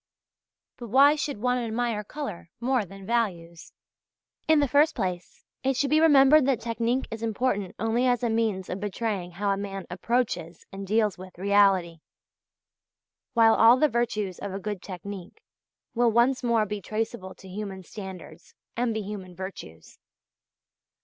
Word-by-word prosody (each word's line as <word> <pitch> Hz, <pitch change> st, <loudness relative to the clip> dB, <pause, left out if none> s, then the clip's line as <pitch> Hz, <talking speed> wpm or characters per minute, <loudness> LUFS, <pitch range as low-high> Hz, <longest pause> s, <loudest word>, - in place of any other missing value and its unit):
But 240 Hz, -, -8 dB
why 275 Hz, +6 st, +6 dB
should 290 Hz, -3 st, -3 dB
one 250 Hz, +2 st, +1 dB
admire 230 Hz, -2 st, -2 dB
colour 210 Hz, -, -7 dB
more 245 Hz, -2 st, +1 dB
than 195 Hz, +1 st, -12 dB
values? 180 Hz, -8 st, -2 dB, 0.8 s
In 315 Hz, -1 st, +5 dB
the 285 Hz, -, +2 dB
first 290 Hz, +4 st, +3 dB
place 180 Hz, -2 st, -4 dB, 0.2 s
it 265 Hz, 0 st, +1 dB
should 280 Hz, +2 st, 0 dB
be 310 Hz, -, +5 dB
remembered 290 Hz, -2 st, +6 dB
that 265 Hz, -5 st, +2 dB
technique 235 Hz, +2 st, -1 dB
is 225 Hz, 0 st, -6 dB
important 220 Hz, -3 st, -1 dB
only 225 Hz, +4 st, +1 dB
as 245 Hz, -1 st, +1 dB
a 235 Hz, -, +1 dB
means 220 Hz, -5 st, 0 dB
of 185 Hz, -, -4 dB
betraying 205 Hz, -2 st, -3 dB
how 200 Hz, +3 st, -2 dB
a 195 Hz, -, 0 dB
man 195 Hz, -2 st, -5 dB
approaches 190 Hz, -4 st, -2 dB
and 195 Hz, 0 st, -7 dB
deals 215 Hz, -2 st, +1 dB
with 185 Hz, -1 st, -11 dB
reality; 195 Hz, -3 st, +3 dB, 1.4 s
while 225 Hz, -1 st, +6 dB
all 230 Hz, +3 st, +6 dB
the 305 Hz, -, +4 dB
virtues 215 Hz, -6 st, -2 dB
of 200 Hz, -, -5 dB
a 195 Hz, -, -4 dB
good 205 Hz, -2 st, -5 dB
technique 190 Hz, 0 st, -8 dB, 0.5 s
will 240 Hz, 0 st, +3 dB
once 240 Hz, +3 st, +3 dB
more 235 Hz, -3 st, +2 dB
be 210 Hz, 0 st, -5 dB
traceable 215 Hz, -2 st, -4 dB
to 190 Hz, -, -14 dB
human 190 Hz, 0 st, -6 dB
standards, 180 Hz, -4 st, -10 dB, 0.2 s
and 235 Hz, -1 st, 0 dB
be 220 Hz, -, -2 dB
human 190 Hz, -3 st, -7 dB
virtues. 190 Hz, -, -9 dB
215 Hz, 155 wpm, -26 LUFS, 190-240 Hz, 1.4 s, why